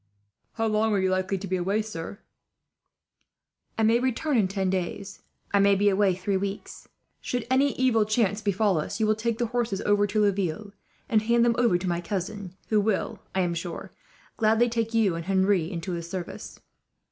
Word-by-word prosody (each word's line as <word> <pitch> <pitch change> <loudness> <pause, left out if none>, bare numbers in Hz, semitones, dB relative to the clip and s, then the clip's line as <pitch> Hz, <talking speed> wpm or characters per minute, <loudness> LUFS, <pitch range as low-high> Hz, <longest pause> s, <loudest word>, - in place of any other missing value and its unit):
"How 225 - -1
long 215 0 +1
are 200 - +2
you 190 0 +1
likely 185 +1 0
to 195 - -6
be 185 0 0
away, 195 +5 0
sir?" 200 -3 -7 1.6
"I 225 - +1
may 225 +2 +4
return 260 +4 0
in 210 -5 +3
ten 190 -1 -1
days. 190 +2 -4 0.3
I 200 - +4
may 200 0 +5
be 205 +1 +3
away 195 -1 +2
three 190 +2 -1
weeks. 200 +1 -6 0.3
Should 245 -2 -3
any 275 +1 +3
evil 250 -4 +2
chance 210 -1 0
befall 200 -3 +1
us, 200 +7 -4
you 220 - +2
will 215 - +3
take 225 +1 -2
the 240 - 0
horses 230 -5 -1
over 205 0 +2
to 210 +1 0
Laville 200 -1 -1 0.3
and 220 -2 +3
hand 235 +2 +3
them 235 - +3
over 235 -7 +3
to 180 +1 -5
my 170 -1 -1
cousin; 195 0 -5
who 215 -2 +3
will, 205 -1 -1 0.2
I 190 - +2
am 175 -1 0
sure, 170 +1 -6 0.5
gladly 225 +2 +3
take 230 0 -2
you 215 -5 +3
and 165 0 -5
Henri 190 -3 +2
into 175 +1 -4
his 170 -1 -5
service. 180 -1 -7
205 Hz, 195 wpm, -26 LUFS, 185-220 Hz, 1.6 s, may